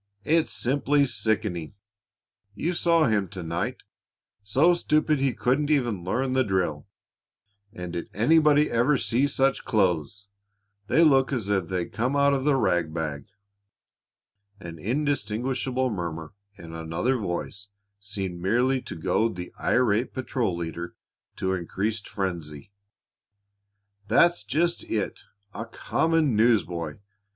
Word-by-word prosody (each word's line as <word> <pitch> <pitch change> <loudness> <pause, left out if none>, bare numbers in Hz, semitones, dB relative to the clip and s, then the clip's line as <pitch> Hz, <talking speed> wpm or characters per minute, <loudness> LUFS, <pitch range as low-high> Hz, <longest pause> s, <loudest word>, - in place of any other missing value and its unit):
It's 160 +1 +2
simply 140 +2 +2
sickening! 105 - -2 0.8
You 170 +11 -1
saw 170 -2 +3
him 105 -6 +1
to 90 0 -7
night; 85 +1 -3 0.6
so 135 - +4
stupid 155 -3 +1
he 135 -2 +1
couldn't 135 +4 +1
even 120 - +1
learn 130 +8 -1
the 130 0 +3
drill, 95 - -1 0.8
and 90 -5 -7
did 85 - -4
anybody 150 +5 +4
ever 125 +5 +3
see 125 +3 +1
such 135 -1 +1
clothes? 100 - 0 0.6
They 165 - +4
look 135 -4 +4
as 115 -7 -2
if 95 -4 +1
they'd 90 -3 -3
come 125 +5 0
out 140 0 +4
of 135 -1 -1
the 145 -2 +4
rag 85 -10 +1
bag." 75 -3 -4 1.3
An 85 -4 -9
indistinguishable 130 - -1
murmur 80 -5 -5 0.2
in 85 -4 -11
another 80 +11 -1
voice 100 +1 -4 0.3
seemed 95 -3 -5
merely 125 +7 +2
to - - -8
goad 110 +7 0
the 90 0 -7
irate 120 -1 +1
patrol 125 -8 -1
leader 85 +1 -5 0.4
to 95 0 -1
increased 100 +5 -3
frenzy. 85 -5 -5 1.4
"That's 175 +8 +4
just 170 +5 0
it 105 -3 -2 0.3
a 115 - -5
common 160 +2 +1
newsboy! 90 -9 +1
110 Hz, 125 wpm, -26 LUFS, 90-135 Hz, 1.4 s, so